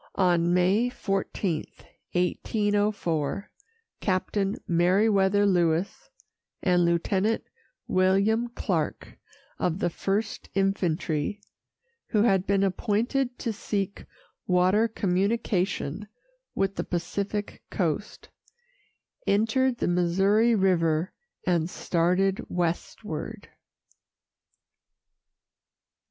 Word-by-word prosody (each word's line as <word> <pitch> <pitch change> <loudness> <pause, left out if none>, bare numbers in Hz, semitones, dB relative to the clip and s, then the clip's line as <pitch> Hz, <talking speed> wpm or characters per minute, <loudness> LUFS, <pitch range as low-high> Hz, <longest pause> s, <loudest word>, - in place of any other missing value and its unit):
On 175 -2 +3
May 190 +7 +3
14, 195 -6 -2 0.5
1804, 200 -3 0 0.5
Captain 195 +1 0
Meriwether 195 +3 +3
Lewis 175 -2 +1 0.5
and 180 -1 +3
Lieutenant 190 +5 +1 0.4
William 195 +5 +2
Clark, 240 - -3 0.4
of 170 -1 0
the 175 -3 0
First 205 +5 -2
Infantry, 190 -3 0 0.7
who 215 -2 +2
had 195 -5 +2
been 200 0 +2
appointed 235 +6 0
to 230 - -3
seek 200 -1 -3 0.4
water 185 +5 +3
communication 195 -3 -1 0.5
with 195 0 0
the - - 0
Pacific 200 +4 -3
Coast, 175 +2 -3 1.0
entered 240 +5 +2
the - - -1
Missouri 195 +6 +3
River 170 -3 +2 0.3
and 170 -2 +1
started 180 +3 +1
westward. 175 +3 -3
195 Hz, 80 wpm, -27 LUFS, 175-210 Hz, 1.0 s, On